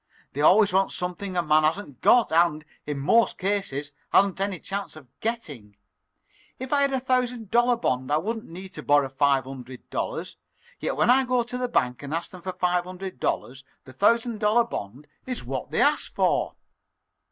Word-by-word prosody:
They 145 - -3
always 200 +5 +5
want 195 +1 +2
something 180 +1 -4
a 175 - +2
man 155 -1 +4
hasn't 155 - -2
got 245 -7 +5
and, 160 -2 +2 0.2
in 145 -1 -3
most 230 +12 +3
cases, 185 -8 -2 0.2
hasn't 195 -1 +3
any 195 -3 -1
chance 200 +1 -5
of 155 -4 -13
getting. 145 - -5 0.8
If 260 +2 -5
I 285 - +3
had 280 0 +2
a 265 - +1
thousand 250 -4 -1
dollar 240 +1 +4
bond 130 - -1
I 150 - +4
wouldn't 220 +7 -3
need 185 +3 -9
to 170 -5 -9
borrow 145 -2 +3
five 135 0 +2
hundred 130 -1 -10
dollars, - - -4 0.4
yet - - -2
when 235 - +4
I 265 +1 +5
go 250 -1 +1
to 245 +2 -8
the 250 0 -1
bank 125 - 0
and 145 +2 -4
ask 165 - -4
for 185 - -10
the 185 +1 -5
five 180 -1 0
hundred 185 -5 -8
the 130 0 -4
thousand 230 - +2
dollar 215 +3 +4
bond 135 - -7 0.2
is 255 -2 -4
what 130 +1 -5
they - - -1
ask - - +1
for." - - +1
185 Hz, 185 wpm, -25 LUFS, 145-230 Hz, 0.8 s, always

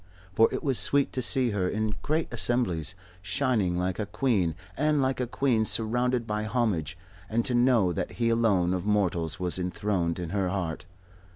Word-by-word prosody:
For 115 +4 +4
it - - -4
was 135 -4 +3
sweet 140 -1 +4
to 130 - -1
see 125 -1 +5
her 95 -3 -1
in 110 0 -2
great 155 +2 -1
assemblies, 95 - +1 0.3
shining 95 0 0
like 90 +2 -2
a 105 - -3
queen 100 - 0 0.2
and 150 +1 +1
like 130 -1 0
a 125 - -1
queen 125 -2 0
surrounded 120 +3 +1
by 105 0 -3
homage, 105 - -1 0.3
and 115 +1 0
to 125 - 0
know 120 -7 +3
that - - -4
he 115 -1 0
alone 105 -6 +2
of 90 -1 -3
mortals 95 -5 -1
was 90 0 -1
enthroned 90 -1 -2
in 85 -2 -5
her 95 -2 -1
heart. 90 -3 -4
105 Hz, 180 wpm, -27 LUFS, 90-120 Hz, 0.3 s, see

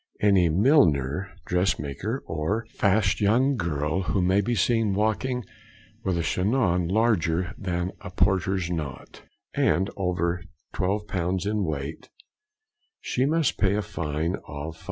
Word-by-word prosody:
Any 95 -4 +4
Milliner, 90 - +3 0.2
dress 90 +2 +1
maker, 100 - -4
or 85 +8 -2
fast 100 +2 +2
young 125 +7 +3
girl 80 - -1
who 95 +2 0
may 95 +3 +3
be 120 +4 -1
seen 110 0 +2
walking 115 +4 0 0.6
with 95 -3 0
a 85 - 0
chignon 90 -1 +1
larger 95 -4 +1
than 90 -3 -2
a - - -7
porter's 95 -1 +1
knot, 75 -7 -5 0.3
and 95 +2 +2
over 90 -2 -1 0.3
12 100 +2 -1
pounds 90 -1 -1
in 105 0 0
weight, 75 -2 -4 0.9
she 130 +2 0
must 160 -1 +1
pay 100 -1 +3
a 105 - 0
fine 80 +2 -2
of 75 +1 -6
5s. - - -19
95 Hz, 135 wpm, -26 LUFS, 85-105 Hz, 0.9 s, Any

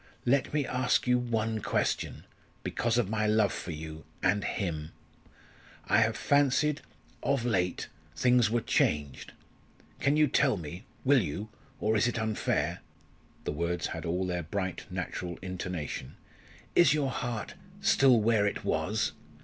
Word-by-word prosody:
Let 135 +2 +2
me 150 -2 +1
ask 125 0 +1
you 125 0 +3
one 115 -2 -1
question - - -1 0.4
because 120 0 0
of 120 -5 +2
my 110 +1 0
love 105 -2 +3
for - - -6
you 80 -1 -6 0.2
and 100 +2 +2
him. 80 -6 -3 0.9
I 105 - +5
have 110 -1 +2
fancied 145 +1 +2 0.4
of 135 -4 0
late 90 -7 0 0.3
things 125 +3 +4
were 120 +1 +1
changed. 75 -9 0 0.7
Can 140 +2 +2
you 155 - +6
tell 130 -3 +3
me 85 - -7 0.2
will 135 -1 +5
you? 100 +8 -4 0.3
or 110 +1 +1
is 110 - +3
it 120 - -1
unfair?" 110 -1 0 0.6
the - - -2
words 85 +3 -1
had - - -5
all 90 +2 -1
their 90 -1 -1
bright, 95 +2 -4
natural 85 -1 -4
intonation 90 -7 -5 0.6
"Is 155 -4 +6
your 140 -3 0
heart 120 -4 -3 0.3
still 135 - +5
where 110 -2 +3
it - - -3
was? - - 0
110 Hz, 145 wpm, -30 LUFS, 90-125 Hz, 0.9 s, you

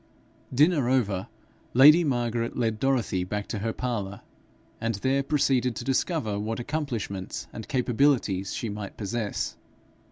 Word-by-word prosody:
Dinner 145 -1 +3
over, 105 -8 +1 0.5
lady 150 +7 +8
Margaret 120 -4 -1
led 110 -3 0
Dorothy 120 -8 +1
back 105 +2 -3
to 110 - -3
her 110 +2 -1
parlour, 105 -5 -3 0.6
and 115 -1 0
there 130 +7 +1
proceeded 135 -4 +1
to - - -5
discover 135 - 0
what 110 +2 -3
accomplishments 120 -9 -3
and 110 - -7
capabilities 125 -7 +1
she 115 - -3
might 105 -2 -6
possess. 110 0 -3
120 Hz, 130 wpm, -27 LUFS, 105-135 Hz, 0.6 s, lady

